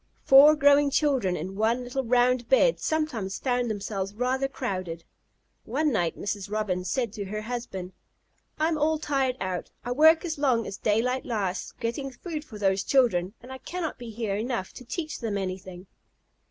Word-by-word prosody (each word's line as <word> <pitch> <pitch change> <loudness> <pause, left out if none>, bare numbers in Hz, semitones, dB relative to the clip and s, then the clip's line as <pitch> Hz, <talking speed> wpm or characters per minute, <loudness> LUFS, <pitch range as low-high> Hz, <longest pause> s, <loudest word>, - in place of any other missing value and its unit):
Four 285 +3 +8
growing 285 0 +5
children 265 - +1
in 190 - -5
one 225 +4 +1
little 255 +2 -3
round 245 0 +2
bed - - +4
sometimes 245 -12 -2
found 245 -2 0
themselves 200 -1 -3
rather 255 +3 0
crowded. 185 -11 -4 0.6
One 295 +6 0
night 175 -8 0
Mrs. 205 -1 -4
Robin 205 -4 -1
said 230 +3 -1
to 205 -2 -5
her 210 +2 -5
husband: 215 -6 -5 0.6
"I 310 - +2
am 320 -2 0
all 310 +1 +2
tired 270 -4 0
out. 185 -2 -3 0.2
I 245 - -2
work 320 +6 +5
as 320 -4 -3
long 250 -6 +2
as 195 - -6
daylight 245 +5 +1
lasts 200 -6 -3
getting 240 +4 -3
food 300 +4 -6
for 250 -9 -11
those 195 -1 +1
children, 205 -7 +2
and 250 - -11
I 260 - -7
cannot 345 0 -5
be 240 -1 -7
here 220 -2 -3
enough 225 -2 -3
to - - -10
teach 310 +5 -4
them 220 -4 -2
anything." 185 -1 -5
240 Hz, 175 wpm, -27 LUFS, 200-275 Hz, 0.6 s, Four